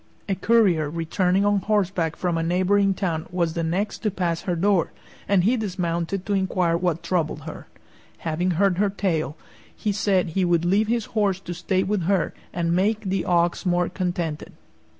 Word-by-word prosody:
A 200 - 0
courier 190 -7 +3
returning 180 +4 +1
on 205 -1 +3
horseback 190 -6 0
from 175 -2 -1
a 165 - 0
neighboring 190 +3 +2
town 165 -5 -2
was 170 -2 -1
the 170 - -2
next 180 +6 -1
to 215 - 0
pass 175 -4 -2
her 180 - -2
door, 190 0 +2 0.4
and 195 -3 +3
he 230 +7 +3
dismounted 180 -3 -2
to 205 - -1
inquire 185 -3 +1
what 170 -1 -1
troubled 170 -3 -1
her. 160 +2 -9 0.6
Having 165 +3 0
heard 195 -1 +2
her 205 0 +3
tale, 165 -7 -1 0.4
he 210 - -1
said 195 -3 +1
he 185 +4 0
would 175 -1 +2
leave 200 +4 +2
his 230 -1 0
horse 200 -4 +1
to 175 - -6
stay 185 +2 0
with 195 -3 -1
her, 190 -1 +1 0.2
and 170 -1 0
make 210 +4 +1
the 190 -2 -2
ox 175 -1 +1
more 175 -2 +1
contented. 175 -4 -3
180 Hz, 180 wpm, -24 LUFS, 170-200 Hz, 0.6 s, courier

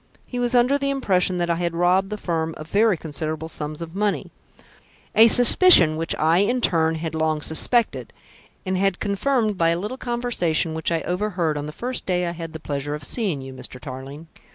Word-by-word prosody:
He 245 - -6
was 245 +1 0
under 250 +4 +3
the 275 0 -1
impression 190 -9 +1
that 175 -1 -1
I 170 - 0
had 170 -1 -2
robbed 180 +3 +2
the 210 - -4
firm 165 -4 -3
of 155 - -9
very 210 -2 +3
considerable 155 0 -5
sums 155 0 -5
of 165 0 -10
money 205 +1 -2 0.8
a 225 +1 +7
suspicion 240 - +6
which 165 +1 -2
I 160 +3 +2
in 240 +6 +1
turn 165 -7 +1
had 160 0 -5
long 155 -1 -1
suspected, 235 +9 0 0.5
and 185 0 -1
had 195 -2 0
confirmed 215 0 0
by 165 0 +3
a 170 +1 0
little 210 +7 -5
conversation 235 -11 -1
which 160 +1 -2
I 165 -1 0
overheard 180 -4 -2
on 145 0 -4
the - - -6
first 245 +10 -5
day 180 -1 0
I 170 - -2
had 165 -1 -8
the 160 - -7
pleasure 145 0 -4
of 150 - -9
seeing 185 - -1
you, 130 0 -9
Mr. 125 0 -9
Tarling." 135 +3 -9
175 Hz, 200 wpm, -22 LUFS, 160-210 Hz, 0.8 s, a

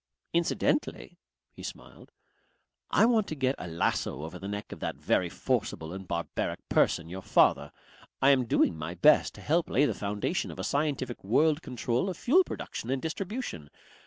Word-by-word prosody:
"Incidentally," 170 0 0 0.3
he - - -13
smiled, - - -10 0.8
"I 210 - +5
want 225 -3 +3
to 155 - -4
get 130 -2 +1
a - - -6
lasso 80 -3 -1
over 80 +3 -7
the 95 - -6
neck 105 +1 -5
of - - -8
that - - -3
very - - +1
forcible 80 +1 -2
and 95 -1 -8
barbaric 85 -1 -3
person, 85 - +2
your 95 +3 -7
father. 70 -5 +3 0.5
I 135 - +6
am 130 -2 +3
doing 90 - +3
my 80 +3 -5
best 150 - +4
to - - -11
help 165 +2 +1
lay 140 - +3
the - - 0
foundation 100 0 -2
of - - -8
a - - -4
scientific 140 -4 -1
world 150 +10 +3
control 125 - -1
of 180 - -5
fuel 350 +10 +4
production 120 - -6
and 135 0 0
distribution. 175 - -5
125 Hz, 175 wpm, -29 LUFS, -, 0.8 s, I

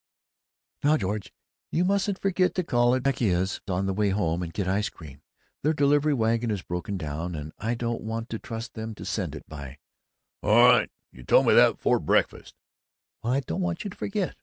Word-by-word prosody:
"Now, 150 +2 +4
George, 105 -2 -3 0.4
you 175 +3 +1
mustn't 200 0 +1
forget 185 -1 +1
to 185 - 0
call 120 -4 +3
in - - +2
at 130 - -5
Vecchia's 100 -9 0
on 95 0 -1
the 95 - 0
way 105 +1 +1
home 90 -4 0
and 85 -2 -4
get 100 - -2
the 95 - -1
ice 105 +2 0
cream. 75 -4 -13 0.4
Their 155 +3 +2
delivery 145 +1 +3
wagon 115 0 +1
is 100 -4 -2
broken 90 +3 -4
down, 80 +2 -4
and 75 0 -7
I 115 +3 -1
don't 115 0 -3
want 115 +1 -4
to 110 - -3
trust 115 +1 -7
them 110 -1 -6
to - - -9
send - - -3
it - - -10
by 70 -3 -9 0.3
" - - -60
"All 105 +2 +3
right! 125 -1 +5 0.2
You 65 - -14
told - - +4
me - - +5
that - - +6
before - - +2
breakfast!" - - 0 0.7
"Well, 120 +2 0
I 135 - +2
don't 185 - -4
want 180 -2 -2
you 205 - -5
to - - -11
forget. 200 -3 -2
115 Hz, 215 wpm, -26 LUFS, 95-140 Hz, 0.7 s, that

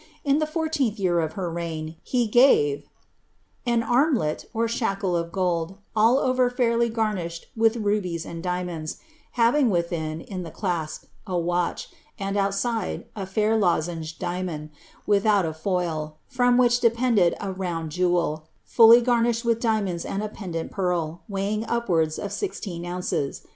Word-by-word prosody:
In 285 +1 +3
the 310 - 0
fourteenth 310 -8 -1
year 180 -4 +1
of 160 -1 -1
her 185 -3 -3
reign, 165 -1 -4
he 245 -3 0
gave^ 210 - +4 0.8
An 235 -1 +2
armlet, 240 - +1
or 230 0 0
shackle 195 -6 -1
of 170 0 -2
gold, 180 -1 -1 0.2
all 225 +4 +5
over 255 -2 +2
fairly 235 -2 +1
garnished 210 -7 -2
with 225 0 +3
rubies 205 -6 -1
and 165 -1 -7
dia 180 0 -1
monds, 160 -3 -5 0.4
having 245 +2 +3
within, 170 -4 -1
in 185 0 -6
the 170 - -6
ciasp, 170 -3 -3 0.2
a 185 -2 -1
watch, 175 0 -1 0.3
and 195 0 -3
outride, 200 +2 -1
a 195 -3 -5
fair 215 +3 +1
lozenge 165 -5 0
diamond, 175 -4 -4 0.3
without 205 -2 +3
a 160 - -2
foil, 160 -3 -2
from 245 -1 +2
which 245 -1 +4
depended 230 -6 +3
a 200 -1 -3
round 175 -4 -4
jewel, 175 -3 0 0.2
fully 230 +1 +7
garnished 235 -1 +1
with 230 -1 +2
diap 220 -3 +2
monds 175 -3 -3
and 200 +2 -3
a 215 - -3
pendent 175 -6 -5
pearl, 175 -4 -1
weighing 200 +2 -1
upwards 170 -10 +1
of 200 - -5
sixteen 190 - -4
ounces. 175 -5 -3
195 Hz, 155 wpm, -25 LUFS, 170-230 Hz, 0.8 s, fully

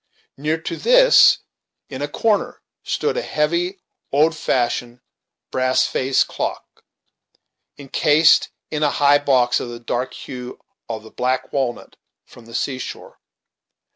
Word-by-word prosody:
Near 155 +3 -2
to 165 +1 -5
this, - - +6 0.5
in 135 -1 -7
a 145 - -1
corner, 210 +7 -1 0.2
stood 455 +2 -2
a - - 0
heavy, 170 - -1 0.3
old 155 +4 +3
fashioned, 120 -3 -1 0.5
brass 130 0 +2
faced 130 0 +1
clock, - - -6 0.9
incased 150 +3 +3 0.2
in 150 - -2
a 150 - +3
high 145 0 +4
box, 130 -4 +2
of 120 - -6
the 120 0 -8
dark 120 +2 -3
hue 125 -1 -8 0.3
of 110 -1 -5
the 110 - -14
black 130 +1 -2
walnut 130 -4 -3 0.3
from 115 -2 -17
the 115 - -10
seashore. 130 -2 -5
140 Hz, 130 wpm, -20 LUFS, 125-155 Hz, 0.9 s, this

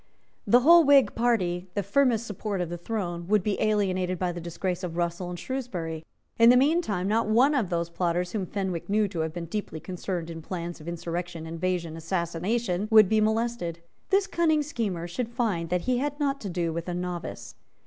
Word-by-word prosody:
The 245 +1 +6
whole 335 +5 +8
Whig 280 -2 +5
party, 185 -7 0
the 205 - 0
firmest 235 +1 +2
support 210 -1 -4
of 175 -2 -2
the 175 - -3
throne, 175 -4 -4
would 210 -1 +3
be 205 0 -1
alienated 185 -4 +1
by 180 0 -1
the 175 0 -6
disgrace 180 +2 -3
of 170 -2 -4
Russell 175 +1 -2
and 175 - -5
Shrewsbury. 175 -10 -4 0.4
In 230 0 +8
the 250 - +7
meantime 260 - +2
not 220 +1 +1
one 250 +7 +4
of 240 -10 0
those 170 -1 -2
plotters 175 +1 -1
whom 200 -4 -2
Fenwick 190 -4 -3
knew 210 +1 +2
to 180 -4 -5
have 160 0 -1
been 170 +1 -5
deeply 170 -2 -4
concerned 180 -1 -4
in 165 0 -7
plans 170 0 -5
of 155 - -12
insurrection, 170 0 -4
invasion, 165 0 -2
assassination, 180 +5 -1
would 215 -4 +7
be 220 -1 +3
molested. 220 -5 0 0.3
This 390 0 +3
cunning 320 -5 +2
schemer 205 - -3
should 230 +7 -3
find 215 -9 -1
that 180 0 +1
he 250 +2 0
had 290 +2 -2
not 280 -1 0
to 200 - -4
do 170 -2 -1
with 170 +2 -4
a 175 - -2
novice. 180 -1 -5
185 Hz, 200 wpm, -27 LUFS, 170-230 Hz, 0.4 s, whole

